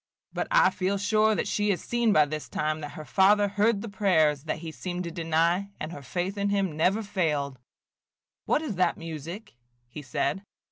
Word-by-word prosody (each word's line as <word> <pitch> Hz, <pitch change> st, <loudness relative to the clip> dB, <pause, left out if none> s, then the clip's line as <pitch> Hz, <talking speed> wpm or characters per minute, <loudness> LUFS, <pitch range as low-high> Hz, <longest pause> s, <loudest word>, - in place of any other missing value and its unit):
But -, -, -2 dB
I -, -, +5 dB
feel 190 Hz, +1 st, -1 dB
sure 215 Hz, +2 st, +2 dB
that -, -, -1 dB
she 210 Hz, 0 st, 0 dB
has 185 Hz, -4 st, +1 dB
seen 240 Hz, +2 st, +1 dB
by 155 Hz, -6 st, +5 dB
this 150 Hz, +1 st, -6 dB
time 155 Hz, 0 st, -1 dB
that 145 Hz, -2 st, -7 dB
her 155 Hz, -, -8 dB
Father 205 Hz, +3 st, +4 dB
heard 205 Hz, +1 st, +1 dB
the -, -, -5 dB
prayers 160 Hz, -8 st, +2 dB
that 155 Hz, -, -2 dB
he 160 Hz, 0 st, -7 dB
seemed 180 Hz, +2 st, -5 dB
to 170 Hz, -, -5 dB
deny, 170 Hz, +3 st, +1 dB
and 155 Hz, -, -5 dB
her 145 Hz, -, -8 dB
faith 180 Hz, +9 st, -3 dB
in 200 Hz, 0 st, +1 dB
him 195 Hz, -5 st, 0 dB
never 190 Hz, +8 st, +2 dB
failed. 150 Hz, -9 st, -1 dB, 0.9 s
What 310 Hz, -, +1 dB
is 230 Hz, -, -4 dB
that 180 Hz, -2 st, +2 dB
music?" 165 Hz, +5 st, -7 dB, 0.3 s
he 150 Hz, +5 st, -9 dB
said. 140 Hz, +5 st, -1 dB
180 Hz, 195 wpm, -27 LUFS, 155-205 Hz, 0.9 s, I